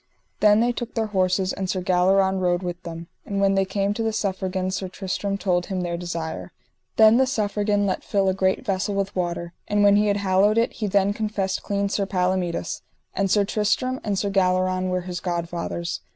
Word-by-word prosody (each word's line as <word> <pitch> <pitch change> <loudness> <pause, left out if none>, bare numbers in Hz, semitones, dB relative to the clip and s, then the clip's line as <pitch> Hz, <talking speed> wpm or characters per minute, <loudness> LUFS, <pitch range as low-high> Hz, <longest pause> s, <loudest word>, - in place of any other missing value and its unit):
Then 210 +1 +5
they 240 +1 +2
took 240 0 -6
their 225 -1 +1
horses 185 0 +1
and 190 -1 -4
Sir 185 - 0
Galleron 190 +1 +2
rode 180 0 +1
with 175 -1 -4
them. 165 -1 -7 0.2
And 200 -1 -3
when 195 0 +3
they 195 0 +2
came 195 +1 -1
to 225 - -4
the 225 0 0
Suffragan 190 -2 -2
Sir 190 0 -3
Tristram 195 +1 -3
told 180 -3 0
him 190 -2 -2
their 175 -1 -2
desire. 170 -2 -5 0.4
Then 220 +1 +7
the 265 0 +3
Suffragan 205 -3 0
let 190 - -1
fill 195 -2 +1
a 190 - +3
great 190 +5 0
vessel 195 -1 -1
with 195 0 -2
water, 170 -1 -3
and 205 0 +2
when 205 0 +6
he 210 0 +3
had 205 0 +2
hallowed 200 +2 +2
it 230 - +2
he 215 - -3
then 200 0 +2
confessed 205 -3 -2
clean 200 0 -1
Sir 200 0 -1
Palomides, 180 -2 -1 0.3
and 195 -1 0
Sir 200 +1 +3
Tristram 240 +6 0
and 205 -2 -1
Sir 200 +1 -1
Galleron 185 -1 +1
were 180 0 0
his 180 -1 -5
godfathers. 170 -1 -3
195 Hz, 205 wpm, -23 LUFS, 185-205 Hz, 0.4 s, Then